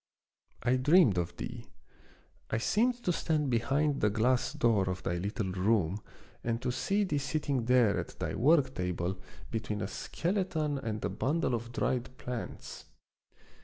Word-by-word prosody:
I 125 +2 +3
dreamed 130 - +5
of 85 - -3
thee. - - -6 0.8
I 110 - 0
seemed 240 - +1
to 180 - +2
stand 150 -5 0
behind 135 +5 +1
the 105 - +4
glass 120 +4 +2
door 105 -5 +2
of 90 0 -4
thy 85 - -1
little 100 +2 -2
room 95 -1 +1 0.4
and 115 -1 -1
to 125 - 0
see 195 +11 +1
thee 150 -7 0
sitting 140 -3 -1
there 120 -4 +4
at - - -6
thy - - -3
work 135 +1 +3
table 90 0 -2 0.3
between 110 -2 -2
a 95 - -1
skeleton 165 - -1
and 110 -4 -3
a - - 0
bundle 135 - 0
of 120 0 -3
dried 125 +1 -1
plants. 125 -2 -6
120 Hz, 155 wpm, -31 LUFS, 105-145 Hz, 0.8 s, dreamed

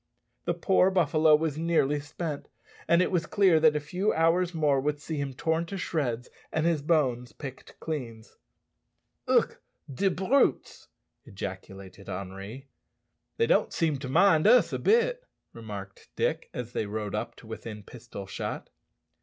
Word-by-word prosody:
The - - 0
poor 190 -1 +3
buffalo 160 -4 +4
was 155 -1 -1
nearly 160 -3 +2
spent, 150 +1 -5 0.4
and 170 +2 +5
it - - -2
was 170 -3 0
clear 190 -5 +4
that 155 -1 +5
a - - +2
few 180 +8 -1
hours 165 +2 +2
more 150 -5 +2
would 150 +1 -1
see 155 +1 -5
him 140 -2 -3
torn 160 +4 0
to 195 - -5
shreds 130 -9 -2 0.2
and 160 0 0
his 165 -3 +2
bones 130 -6 +1
picked 135 -3 -10
clean. 120 -8 -5 1.0
"Ugh! - - +3 0.4
de 195 +9 +2
brutes," 190 +10 +1 0.4
ejaculated 95 -3 -8
Henri. 100 +8 -7 0.7
"They 460 - +3
don't - - +2
seem 160 -4 0
to 130 -2 -6
mind 160 +3 +5
us 245 +3 +5
a - - -1
bit," - - +2 0.3
remarked 100 -4 -9
Dick, - - -1
as 120 -1 -6
they 105 - -2
rode 105 0 -4
up 105 - -3
to - - -15
within 110 -1 -8
pistol 115 -3 -9
shot. 95 - -5
150 Hz, 155 wpm, -28 LUFS, 115-170 Hz, 1.0 s, and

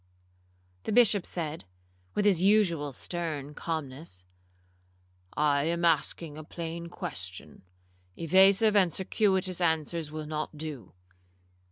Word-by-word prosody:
The - - -4
Bishop 215 -4 +4
said, 160 - -4 0.5
with 205 - +1
his 190 -5 +4
usual 185 -8 +3
stern 150 0 -4
calmness, 145 - -5 1.1
'I 145 -1 +3
am 170 +1 0
asking 160 -1 0
a - - -7
plain 170 +1 -6
question—evasive 90 - 0
and 185 -4 +4
circuitous 190 0 0
answers 160 -1 0
will 155 0 -5
not 155 0 -4
do. 145 - -7
160 Hz, 100 wpm, -29 LUFS, 145-180 Hz, 1.1 s, Bishop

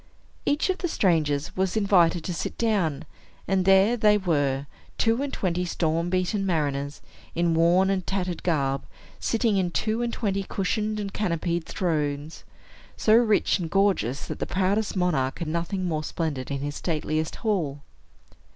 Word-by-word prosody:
Each 295 +6 +2
of 370 - -5
the 355 - -1
strangers 160 - +1
was 190 +2 0
invited 180 -5 +3
to 180 - -3
sit - - -4
down; 175 -10 0 0.4
and 190 -1 +1
there 195 +4 +5
they 210 -2 +4
were, 145 -7 0 0.3
two 230 +3 +2
and 285 -1 -2
twenty 180 -1 -1
storm 170 -1 0
beaten 185 +2 0
mariners, 145 -5 -1 0.3
in 170 0 +2
worn 175 +4 +4
and 190 -1 0
tattered 180 -3 -2
garb, 140 -5 0 0.4
sitting 225 -3 +1
on 180 -2 0
two 215 +6 -1
and 240 -1 -1
twenty 200 -4 -1
cushioned 210 +3 -2
and 200 -1 -4
canopied 170 -4 -1
thrones, 150 -3 -2 0.5
so 215 - +3
rich 225 -3 +4
and 170 -3 -3
gorgeous 180 - +1
that - - -6
the - - -2
proudest 195 +3 0
monarch 155 -8 0
had 170 - -4
nothing 170 +4 -2
more 155 -3 -1
splendid 150 -5 -3
in 140 -1 -3
his 145 +1 -3
stateliest 155 -1 -2
hall. 155 -10 -1
180 Hz, 160 wpm, -26 LUFS, 155-200 Hz, 0.5 s, there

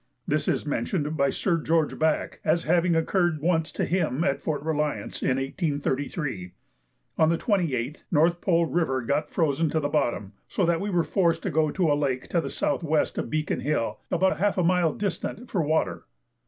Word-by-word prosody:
This - - 0
is - - 0
mentioned 155 -6 -1
by 140 -2 +2
Sir 170 +4 0
George 160 -1 0
Back 155 -1 0
as 165 +2 +2
having 170 +1 +2
occurred 170 0 +1
once 160 0 +1
to - - -1
him 165 -5 0
at 140 -2 0
Fort 145 -3 -2
Reliance, 150 -2 -2
in 130 - +1
1833. 140 - -2 0.7
On 160 - +5
the 165 - +2
28th, 155 - 0
North 170 +2 +3
Pole 170 -3 +3
River 160 -7 0
got 140 +5 0
frozen 160 -1 +1
to 160 - 0
the 145 -1 -1
bottom, 120 -9 -1
so 190 - 0
that 170 -1 +1
we 205 - -2
were 175 -3 +2
forced 170 -3 +1
to 190 - -1
go 155 0 +2
to 170 0 +1
a - - +5
lake 140 -3 -1
to 170 - +1
the - - -5
S.W. 160 -1 -1 0.2
of - - -3
Beacon 155 0 -1
Hill, 115 -6 -1
about 175 -2 +1
half 205 +1 +1
a 180 - +2
mile 175 -2 +3
distant, 210 +5 -4
for 185 - +1
water. 155 +1 -1
160 Hz, 190 wpm, -26 LUFS, 145-175 Hz, 0.7 s, On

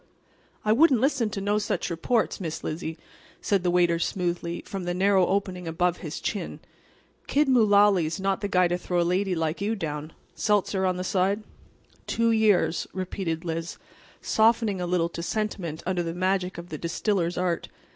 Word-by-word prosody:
"I 215 - +3
wouldn't 270 0 +5
listen 260 -3 +1
to 205 - -4
no 205 +2 +1
such 210 - -2
reports, 220 +9 0
Miss 160 -3 -4
Lizzie," 160 +1 -4 0.4
said 200 -3 +1
the 175 - +1
waiter 175 -1 +3
smoothly, 175 -1 -2
from 195 -2 -5
the 175 0 -1
narrow 190 0 +3
opening 185 -3 -1
above 175 +2 0
his 155 -1 -6
chin. 205 - -4 0.7
"Kid 295 +1 +2
Mullaly's 205 -9 +4
not 195 0 0
the 205 - -1
guy 180 -2 +3
to 175 +1 -1
throw 180 0 -1
a - - +4
lady 185 +2 +1
like 160 +2 -2
you 215 +3 0
down. 155 -4 -5 0.2
Seltzer 200 -2 +1
on 180 -1 0
the 185 - -3
side?" 195 +3 +1 0.6
"Two 230 0 +2
years," 210 -6 +2
repeated 180 -3 -3
Liz, 165 +1 -4 0.5
softening 220 -3 +2
a 175 - -2
little 175 -1 +1
to 170 - -6
sentiment 175 -5 -3
under 180 -1 0
the 165 0 -4
magic 185 0 0
of 170 +1 -8
the 155 - -6
distiller's 175 0 -1
art. 180 -2 -1
185 Hz, 175 wpm, -26 LUFS, 170-205 Hz, 0.7 s, wouldn't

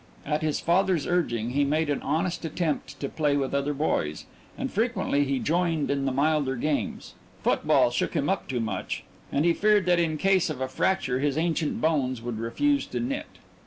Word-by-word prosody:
At 150 +1 0
his 155 -1 0
father's 180 -2 +2
urging 120 -10 0
he 145 +3 +2
made 155 +3 +1
an 145 -2 -1
honest 170 +5 -1
attempt 160 -1 -2
to 140 - -1
play 145 -1 +1
with 135 -1 -1
other 140 +1 0
boys, 150 +3 -1 0.3
and 270 -1 -3
frequently 215 -10 +1
he 135 0 0
joined 165 0 0
in 140 -1 0
the 135 - +1
milder 140 0 +1
games 135 -4 -2 0.3
football 120 - +3
shook 120 - -1
him 145 -2 +1
up 195 - -1
too 125 -3 -2
much, 110 - -3 0.3
and 145 +3 +1
he 170 - +4
feared 210 0 +3
that 175 -1 +3
in 160 -2 +1
case 190 +1 +3
of 150 -4 -4
a 130 - -1
fracture 130 -2 0
his 145 +1 0
ancient 165 -1 0
bones 140 -6 +1
would 115 -1 -5
refuse 280 - +1
to - - -3
knit. 275 +4 -3
150 Hz, 195 wpm, -26 LUFS, 135-175 Hz, 0.3 s, he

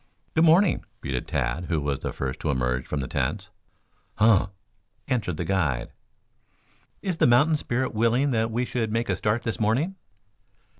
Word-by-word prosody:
"Good 160 +1 +4
morning," 170 +4 +4 0.2
greeted 65 -3 -3
Tad, 65 +6 -1
who 85 -2 0
was 70 -2 -2
the - - -4
first 65 +1 -4
to 80 - -2
emerge 65 -2 0
from 75 - -2
the 65 - -4
tents. - - -2 0.6
"Huh!" 105 -3 +4 0.6
answered 105 -10 -1
the 85 - -2
guide. 75 -10 0 1.1
"Is 185 -4 -1
the - - +4
mountain 140 +7 +5
spirit 130 -3 -2
willing 115 +5 +2
that 115 -1 +1
we 120 +2 -1
should 115 -3 -2
make 115 +2 -1
a - - +2
start 110 +2 0
this 115 - -3
morning?" 125 - +1
110 Hz, 165 wpm, -25 LUFS, -, 1.1 s, mountain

